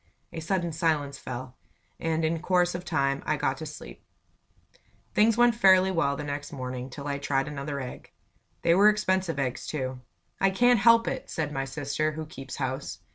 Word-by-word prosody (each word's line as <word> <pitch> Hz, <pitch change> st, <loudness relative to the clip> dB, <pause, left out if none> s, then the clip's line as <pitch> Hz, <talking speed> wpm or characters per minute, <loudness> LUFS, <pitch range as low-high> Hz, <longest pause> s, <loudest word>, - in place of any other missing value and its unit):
A -, -, -4 dB
sudden 170 Hz, +1 st, -1 dB
silence 155 Hz, -3 st, 0 dB
fell, 125 Hz, 0 st, -6 dB, 0.5 s
and 160 Hz, 0 st, 0 dB
in 165 Hz, +1 st, 0 dB
course 180 Hz, 0 st, +2 dB
of 175 Hz, 0 st, -5 dB
time 140 Hz, -5 st, 0 dB
I 155 Hz, -, 0 dB
got 135 Hz, -1 st, 0 dB
to 155 Hz, -, -6 dB
sleep. 145 Hz, -, -10 dB, 1.1 s
Things 220 Hz, +1 st, +4 dB
went 240 Hz, 0 st, +5 dB
fairly 190 Hz, -3 st, +5 dB
well 140 Hz, -6 st, +1 dB
next 145 Hz, -1 st, -5 dB
morning, 130 Hz, -1 st, -5 dB
till 140 Hz, +2 st, -8 dB
I 140 Hz, -1 st, -2 dB
tried 135 Hz, -1 st, 0 dB
another 140 Hz, 0 st, -4 dB
egg. 125 Hz, -2 st, -8 dB, 0.5 s
They 170 Hz, -, +5 dB
were 200 Hz, +4 st, +7 dB
expensive 190 Hz, -6 st, 0 dB
eggs, 130 Hz, -3 st, -2 dB
too. 130 Hz, -4 st, -4 dB, 0.4 s
"I 195 Hz, -, +4 dB
can't 245 Hz, +4 st, +4 dB
help 230 Hz, +2 st, +6 dB
it!" 265 Hz, -, -3 dB
said 155 Hz, -2 st, -2 dB
my 135 Hz, -2 st, -2 dB
sister, 145 Hz, +2 st, -2 dB
who 155 Hz, 0 st, -5 dB
keeps 135 Hz, -3 st, -8 dB
house. 130 Hz, 0 st, -3 dB
155 Hz, 180 wpm, -27 LUFS, 140-185 Hz, 1.1 s, were